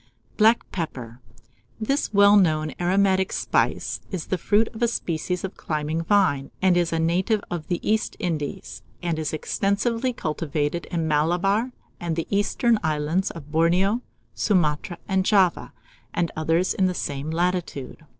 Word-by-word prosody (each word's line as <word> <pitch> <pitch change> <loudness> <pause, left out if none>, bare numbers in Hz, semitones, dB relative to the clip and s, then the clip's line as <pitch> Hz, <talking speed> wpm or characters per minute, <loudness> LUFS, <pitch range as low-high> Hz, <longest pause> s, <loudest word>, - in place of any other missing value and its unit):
] 115 0 -36
BLACK 225 +2 +5
PEPPER. 125 -9 -5 0.6
This 275 +6 0
well 200 0 +6
known 155 -6 +3
aromatic 190 +1 +2
spice - - 0
is 185 -5 -4
the 185 - -1
fruit 215 +5 +2
of 220 - -9
a 235 - +4
species 180 -4 -2
of 190 - -5
climbing 155 +1 -2
vine, 170 -8 +2
and 185 -1 +3
is 175 -1 +1
a 165 - 0
native 180 +6 +1
of 170 -3 -4
the 175 - -1
East 220 0 +1
Indies, 155 -5 -4 0.2
and 170 -2 -1
is 155 - -2
extensively 205 - 0
cultivated 155 - -2
in 165 -3 -2
Malabar 180 +10 +1 0.3
and 170 -2 -2
the 165 - -2
eastern 215 +3 +2
islands 155 +4 0
of 150 -3 -10
Borneo, 180 +8 +2 0.3
Sumatra, 175 -3 0
and 190 -1 +1
Java, 190 -3 +2 0.4
and 170 -1 0
others 165 +3 +1
in 190 - +2
the 180 - -2
same 140 -1 -3
latitude. 170 -4 -2
175 Hz, 150 wpm, -24 LUFS, 155-200 Hz, 0.6 s, well